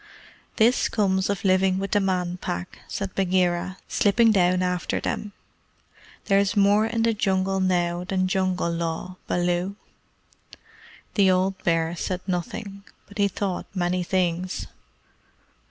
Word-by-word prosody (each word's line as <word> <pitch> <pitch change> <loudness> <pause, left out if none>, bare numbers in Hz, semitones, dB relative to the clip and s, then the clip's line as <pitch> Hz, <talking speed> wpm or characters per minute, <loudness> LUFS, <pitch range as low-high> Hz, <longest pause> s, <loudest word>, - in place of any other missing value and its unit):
"This 235 +2 +3
comes 190 -3 +1
of 200 +1 -2
living 190 0 +3
with 195 +1 -3
the 205 - +3
Man 180 -2 -1
Pack," 90 - -5
said 195 -2 -4
Bagheera, 185 -1 0
slipping 225 +3 +3
down 185 -2 +3
after 180 -1 -1
them. 210 - -3 0.9
"There 195 -1 +4
is 200 +2 +1
more 205 +2 +4
in 230 0 -1
the 230 0 +3
Jungle 195 -2 0
now 175 -2 +1
than 185 0 0
Jungle 185 -2 0
Law, 170 +2 -3
Baloo." 175 +2 0 1.4
The 195 -3 +4
old 185 +1 +1
bear 165 -1 +1
said 180 +1 -3
nothing, 195 +2 -4 0.2
but 205 +1 -12
he 200 - +4
thought 195 -1 -3
many 180 0 0
things. 180 0 -1
185 Hz, 135 wpm, -24 LUFS, 180-200 Hz, 1.4 s, There